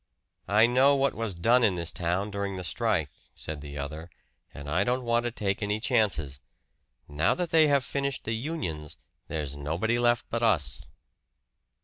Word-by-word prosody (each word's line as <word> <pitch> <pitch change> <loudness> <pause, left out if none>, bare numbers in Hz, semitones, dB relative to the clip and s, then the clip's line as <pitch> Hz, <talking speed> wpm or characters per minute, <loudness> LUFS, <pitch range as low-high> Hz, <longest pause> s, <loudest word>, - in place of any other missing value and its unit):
"I 105 +2 +5
know 130 +4 +4
what 140 -1 +1
was 110 -4 -3
done 120 +8 +3
in 100 -5 +3
this 85 -1 -1
town 90 +4 -1
during 100 -1 -3
the 90 - -5
strike," 80 - 0 0.2
said 75 -2 -6
the 75 0 -8
other, 75 +4 -6 0.4
"and 70 +1 -10
I 85 +6 +1
don't 125 +3 0
want 120 0 +1
to 120 - 0
take 100 -2 -2
any 105 +1 -1
chances. 105 - +1 0.7
Now 75 +2 +1
that 180 -2 -3
they 160 -1 +6
have 140 -3 +2
finished 140 0 -2
the 110 - -2
unions, 110 - -4 0.3
there's 75 -3 -4
nobody 85 +12 -1
left 120 0 +2
but 115 - -1
us." 75 - +1
105 Hz, 170 wpm, -28 LUFS, 80-120 Hz, 0.7 s, they